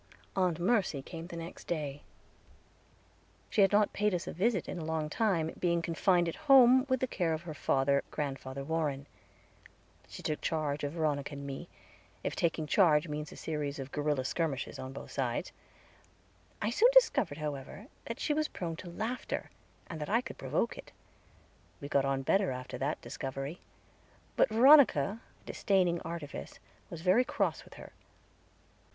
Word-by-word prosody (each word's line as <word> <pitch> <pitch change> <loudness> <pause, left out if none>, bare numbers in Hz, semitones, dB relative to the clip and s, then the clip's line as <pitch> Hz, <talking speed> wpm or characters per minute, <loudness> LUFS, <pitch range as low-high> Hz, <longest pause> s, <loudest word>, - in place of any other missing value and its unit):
Aunt 180 -4 +1
Mercy 180 - +1
came 165 +2 -8
the 175 - -8
next 165 +1 -8
day. 145 -4 -3 1.5
She 210 - +3
had 195 - +5
not 205 0 +3
paid 210 -2 +1
us 175 - -3
a - - -5
visit 195 +1 +1
in - - -5
a - - -5
long 155 -1 -2
time, 180 -8 +1
being 170 -1 +2
confined 175 +1 +2
at 165 - -3
home 260 0 +7
with 260 -1 +1
the - - +3
care 175 -8 0
of 160 +1 -4
her 165 -2 -6
father, 140 -1 +1
Grandfather 135 -1 -4
Warren. 145 -3 -1 1.0
She - - -10
took 155 - -2
charge 150 -3 -1
of 145 +1 -2
Veronica 150 -3 -1
and 140 0 -7
me, 135 -1 -6 0.5
if - - -2
taking 165 -2 0
charge 155 -2 +4
means 150 0 -5
a - - -10
series 150 -2 -3
of 135 -1 -7
guerilla 145 -3 0
skirmishes 150 -2 -2
on 130 0 -6
both 135 - -9
sides. 125 -4 -2 1.1
I 210 - +1
soon 460 - +5
discovered, 220 - +4
however, 150 +5 -5 0.2
that 230 +3 -5
she 300 - 0
was 305 +1 +1
prone 165 -2 -5
to 175 - -8
laughter, 220 +8 -4 0.3
and 160 -3 -7
that 150 - -4
I 230 +4 +3
could - - -9
provoke - - -1
it; - - -11 0.9
we 140 - -6
got 140 -1 +2
on 135 0 0
better 195 +7 +2
after 125 0 -5
that 140 +3 -1
discovery; 135 +5 -5 0.7
but - - +4
Veronica, 230 - +6 0.2
disdaining 180 -4 +1
artifice, 165 -3 -7 0.3
was 165 - -7
very 190 +7 +5
cross - - -1
with - - -15
her. - - -12
165 Hz, 165 wpm, -31 LUFS, 145-195 Hz, 1.5 s, home